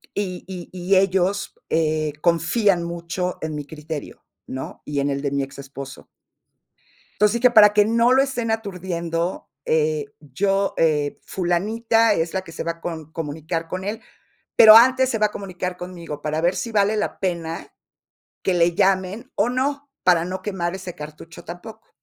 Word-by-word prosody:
y 185 Hz, -3 st, -3 dB
y 180 Hz, -2 st, -7 dB
y 185 Hz, +1 st, 0 dB
ellos, 190 Hz, +1 st, +1 dB
eh, 155 Hz, -1 st, +1 dB
confían 175 Hz, +3 st, +2 dB
mucho 170 Hz, +1 st, -3 dB
en 155 Hz, -1 st, -3 dB
mi 150 Hz, -, -5 dB
criterio, 150 Hz, 0 st, -7 dB, 0.2 s
¿no? 130 Hz, 0 st, -7 dB
Y 145 Hz, -1 st, -2 dB
en 140 Hz, -, 0 dB
el 140 Hz, 0 st, -2 dB
de 140 Hz, -1 st, -2 dB
mi 140 Hz, -1 st, 0 dB
ex-esposo 140 Hz, 0 st, -9 dB, 1.1 s
entonces, 210 Hz, 0 st, +5 dB
sí 235 Hz, -, 0 dB
que 250 Hz, +1 st, +6 dB
para 210 Hz, -3 st, +7 dB
que 210 Hz, -, +5 dB
no 230 Hz, +3 st, +3 dB
lo 265 Hz, -, +5 dB
estén 245 Hz, -4 st, -1 dB
aturdiendo, 180 Hz, -5 st, -3 dB, 0.2 s
eh, 155 Hz, -1 st, +1 dB
yo, 195 Hz, +8 st, 0 dB
eh, 150 Hz, -3 st, +1 dB
fulanita 220 Hz, +5 st, +1 dB
es 165 Hz, 0 st, -1 dB
la 190 Hz, -, -1 dB
que 165 Hz, -, -12 dB
se 165 Hz, -, -5 dB
va 170 Hz, 0 st, -2 dB
a 165 Hz, -, -23 dB
con 160 Hz, -3 st, -6 dB
comunicar 160 Hz, +1 st, -4 dB
con 185 Hz, +2 st, -4 dB
él, 220 Hz, +3 st, -3 dB, 0.6 s
pero, 220 Hz, -1 st, +10 dB
antes 260 Hz, +2 st, +6 dB
se 225 Hz, -, -1 dB
va 215 Hz, -, +4 dB
a 210 Hz, -, -5 dB
comunicar 185 Hz, -2 st, -5 dB
conmigo, 170 Hz, -5 st, -7 dB
para 155 Hz, +1 st, -1 dB
ver 175 Hz, +3 st, +1 dB
si 230 Hz, -, -4 dB
vale 205 Hz, +1 st, +2 dB
la 210 Hz, -, -2 dB
pena 170 Hz, -3 st, -3 dB, 0.7 s
que 185 Hz, -, +1 dB
le 170 Hz, 0 st, +3 dB
llamen, 195 Hz, +6 st, +1 dB
o 210 Hz, +4 st, +2 dB
no, 280 Hz, +3 st, -2 dB
para 175 Hz, -2 st, +4 dB
no 185 Hz, +1 st, -4 dB
quemar 185 Hz, -3 st, -3 dB
ese 185 Hz, -2 st, -8 dB
cartucho 150 Hz, +2 st, -10 dB
tampoco. 215 Hz, +6 st, -10 dB
180 Hz, 175 wpm, -22 LUFS, 160-210 Hz, 1.1 s, pero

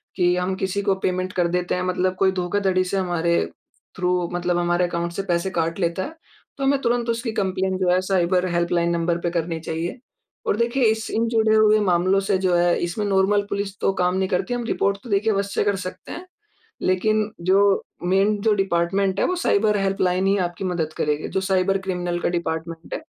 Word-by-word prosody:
कि 180 Hz, -1 st, +2 dB
हम 180 Hz, +1 st, -1 dB
किसी 190 Hz, +1 st, -2 dB
को 200 Hz, -1 st, +1 dB
पेमेंट 185 Hz, 0 st, -1 dB
कर 175 Hz, -1 st, +1 dB
देते 180 Hz, 0 st, -1 dB
हैं 180 Hz, -, -2 dB
मतलब 185 Hz, 0 st, 0 dB
कोई 190 Hz, -1 st, +4 dB
धोखाधड़ी 185 Hz, 0 st, 0 dB
से 185 Hz, +2 st, -2 dB
हमारे 175 Hz, -2 st, 0 dB, 0.6 s
थ्रू 180 Hz, -1 st, 0 dB
मतलब 175 Hz, 0 st, 0 dB
हमारे 175 Hz, +1 st, +1 dB
अकाउंट 170 Hz, 0 st, -3 dB
से 195 Hz, +3 st, -4 dB
पैसे 175 Hz, 0 st, 0 dB
काट 165 Hz, +2 st, -1 dB
लेता 170 Hz, +1 st, 0 dB
है, 320 Hz, -, -7 dB, 0.4 s
तो 275 Hz, -, -4 dB
हमें 275 Hz, 0 st, +3 dB
तुरंत 240 Hz, -1 st, 0 dB
उसकी 230 Hz, 0 st, -1 dB
कंप्लेन 190 Hz, -3 st, -1 dB
जो 185 Hz, -1 st, +1 dB
है 180 Hz, -, +4 dB
साइबर 185 Hz, -1 st, +1 dB
हेल्पलाइन 170 Hz, 0 st, +1 dB
नंबर 170 Hz, 0 st, 0 dB
पे 170 Hz, -, 0 dB
करनी 165 Hz, -1 st, -2 dB
चाहिए। 165 Hz, +6 st, -4 dB, 0.5 s
और -, -, +1 dB
देखिए 235 Hz, +3 st, +1 dB
इस 220 Hz, 0 st, -3 dB
इन 230 Hz, +1 st, 0 dB
जुड़े 220 Hz, -1 st, +3 dB
हुए 215 Hz, 0 st, +5 dB
मामलों 185 Hz, -1 st, +2 dB
से 195 Hz, -, +3 dB
जो 185 Hz, -1 st, +1 dB
है 175 Hz, 0 st, +3 dB
इसमें 175 Hz, +5 st, -2 dB
नॉर्मल 200 Hz, +1 st, +3 dB
पुलिस 200 Hz, -1 st, -3 dB
तो -, -, +2 dB
काम 180 Hz, -1 st, +1 dB
नहीं 190 Hz, 0 st, 0 dB
करती, 190 Hz, +6 st, -1 dB
हम 245 Hz, 0 st, -2 dB
रिपोर्ट 200 Hz, -3 st, 0 dB
तो 240 Hz, -, -10 dB
देखिए 210 Hz, +2 st, +2 dB
अवश्य 200 Hz, 0 st, -1 dB
कर 205 Hz, -, +1 dB
सकते 185 Hz, -, -8 dB
हैं। 350 Hz, -, -7 dB, 0.6 s
लेकिन, 215 Hz, +3 st, +1 dB
जो 195 Hz, +2 st, +3 dB, 0.3 s
मेन 195 Hz, +3 st, +3 dB
जो 220 Hz, 0 st, +3 dB
डिपार्टमेंट 190 Hz, 0 st, 0 dB
है, -, -, +3 dB
वो 365 Hz, -, 0 dB
साइबर 215 Hz, -, +2 dB
हेल्पलाइन 190 Hz, -1 st, +1 dB
ही 195 Hz, -, +3 dB
आपकी 175 Hz, +2 st, -6 dB
मदद 165 Hz, -4 st, -2 dB
करेगा, 150 Hz, 0 st, -1 dB
जो 190 Hz, -, -2 dB
साइबर 190 Hz, 0 st, +1 dB
क्रिमिनल 175 Hz, -2 st, -2 dB
का -, -, +1 dB
डिपार्टमेंट 165 Hz, -1 st, -4 dB
है। -, -, -4 dB
185 Hz, 205 wpm, -22 LUFS, 175-200 Hz, 0.6 s, हुए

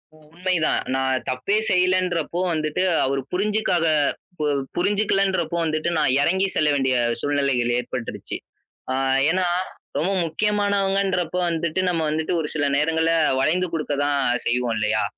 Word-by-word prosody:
அ -, -, -19 dB
உண்மைதான். 175 Hz, 0 st, 0 dB
நான் 130 Hz, -1 st, 0 dB
தப்பே 130 Hz, +11 st, -1 dB
செய்யலன்றப்போ 180 Hz, -2 st, +1 dB
வந்துட்டு 155 Hz, +2 st, -1 dB, 0.2 s
அவரு 135 Hz, +1 st, -1 dB
புரிஞ்சுக்காத 195 Hz, -3 st, +1 dB, 0.5 s
பு 150 Hz, -, 0 dB, 0.3 s
புரிஞ்சுக்கலன்றப்போ 190 Hz, -3 st, +1 dB
வந்துட்டு, 155 Hz, +1 st, -1 dB
நான் 145 Hz, -4 st, +2 dB
எறங்கி 190 Hz, +6 st, +2 dB
செல்ல 150 Hz, -, +2 dB
வேண்டிய 130 Hz, -2 st, +1 dB, 0.2 s
சூழ்நிலைகள் 140 Hz, -4 st, 0 dB
ஏற்பட்டுருச்சு. 125 Hz, -1 st, -5 dB, 0.5 s
ஆ -, -, +1 dB, 0.4 s
ஏன்னா, 180 Hz, +1 st, +1 dB, 0.5 s
ரொம்ப 165 Hz, +7 st, 0 dB
முக்கியமானவங்கன்றப்போ 195 Hz, -1 st, 0 dB
வந்துட்டு, 170 Hz, +2 st, -1 dB
நம்ம 170 Hz, -2 st, 0 dB
வந்துட்டு 160 Hz, +3 st, -1 dB
ஒரு 150 Hz, -, -3 dB
சில 145 Hz, -2 st, 0 dB
நேரங்கள்ல 160 Hz, +2 st, +1 dB, 0.3 s
வளைந்து 180 Hz, +6 st, +1 dB
குடுக்க 150 Hz, -2 st, -2 dB
தான் 145 Hz, -1 st, +1 dB, 0.2 s
செய்வோம் 120 Hz, -1 st, 0 dB
இல்லயா? 110 Hz, 0 st, +1 dB
160 Hz, 125 wpm, -23 LUFS, 145-185 Hz, 0.5 s, நான்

